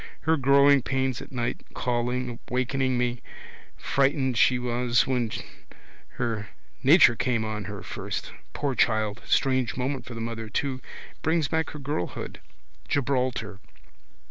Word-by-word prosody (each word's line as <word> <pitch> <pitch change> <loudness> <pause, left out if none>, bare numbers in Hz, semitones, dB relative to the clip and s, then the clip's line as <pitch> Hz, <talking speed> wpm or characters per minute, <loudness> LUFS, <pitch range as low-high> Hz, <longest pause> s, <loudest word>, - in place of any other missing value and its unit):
Her 160 +1 +3
growing 140 0 +5
pains 130 0 -1
at - - -10
night, 120 -2 -2
calling, 125 0 -1
wakening 130 +1 0
me. 120 0 -1 0.6
Frightened 135 -2 +1
she 125 +2 +4
was 120 -1 +1
when 125 -3 0 0.8
her 110 -3 -2 0.3
nature 135 -4 +7
came 115 -2 0
on 105 -2 -4
her - - -6
first. - - -5 0.2
Poor 140 -2 -1
child! 110 -4 +1
Strange 130 -3 +2
moment 130 0 -2
for 120 - -8
the - - -5
mother 115 -1 -4
too. 130 +2 -2 0.4
Brings 160 -1 +1
back 160 0 0
her - - -8
girlhood. 135 -10 -4 0.5
Gibraltar. 125 -7 -1
125 Hz, 130 wpm, -26 LUFS, 120-135 Hz, 0.8 s, nature